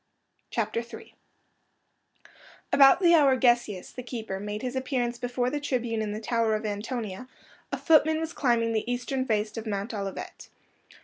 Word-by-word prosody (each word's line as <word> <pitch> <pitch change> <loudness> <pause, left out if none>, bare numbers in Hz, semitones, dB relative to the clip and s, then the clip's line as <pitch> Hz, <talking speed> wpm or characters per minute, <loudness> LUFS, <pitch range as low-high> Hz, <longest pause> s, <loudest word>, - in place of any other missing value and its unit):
CHAPTER 230 0 -1
III 235 - -10 1.6
About 275 +5 +7
the 345 -2 +6
hour 280 -5 +5
Gesius, 240 -6 +1
the 250 - -7
keeper, 225 -6 -5
made 210 +2 -5
his 255 0 -3
appearance 250 -2 -1
before 245 0 -1
the 295 - -1
tribune 245 -5 -1
in 215 -1 -2
the 210 - -4
Tower 225 -1 +1
of 215 - -4
Antonia, 215 +1 -4 0.4
a - - -1
footman 315 -1 +4
was 325 0 -4
climbing 235 -4 +1
the 225 +2 -1
eastern 260 +2 -2
face 215 -2 -1
of 225 0 -5
Mount 205 +2 -3
Olivet. 195 -2 -6
240 Hz, 160 wpm, -27 LUFS, 215-260 Hz, 1.6 s, About